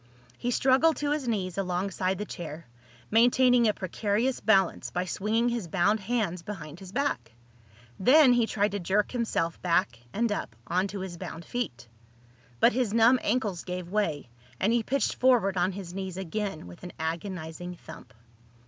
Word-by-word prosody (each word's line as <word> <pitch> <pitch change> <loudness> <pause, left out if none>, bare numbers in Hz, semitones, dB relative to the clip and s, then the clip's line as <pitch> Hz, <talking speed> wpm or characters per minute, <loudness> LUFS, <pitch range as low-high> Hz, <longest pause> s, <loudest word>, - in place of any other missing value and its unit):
He 245 - -3
struggled 265 +6 +4
to 290 0 -1
his 295 -4 -1
knees 195 -5 -1
alongside 185 0 -1
the 210 - -4
chair, 165 -4 -7 0.5
maintaining 245 +1 +5
a 210 - +3
precarious 210 +7 -1
balance 195 -5 +2
by 180 +1 -2
swinging 220 +6 0
his 235 -6 -3
bound 195 +5 +2
hands 195 -4 -1
behind 170 -5 -8
his 190 -1 -10
back. 195 - -1 0.7
Then 260 +6 +6
he 240 -2 +2
tried 205 -1 0
to 205 - -2
jerk 195 +3 +1
himself 225 -9 -1
back 175 -7 +1
and 230 +1 0
up, 200 - -3
onto 190 +5 -1
his 185 -2 -6
bound 165 0 -7
feet. 125 - -4 0.7
But - - +5
his 235 -3 0
numb 230 +3 +6
ankles 210 -6 -1
gave 180 -1 -5
way 160 - -1 0.3
and 210 +4 +2
he 240 - +3
pitched 275 +5 0
forward 240 -7 +3
on 185 +1 +1
his 180 -2 -7
knees 190 -1 -5
again 190 - -4
with 90 0 -12
an 180 - -8
agonizing 170 +1 -4
thump. 105 - -13
195 Hz, 165 wpm, -28 LUFS, 175-235 Hz, 0.7 s, Then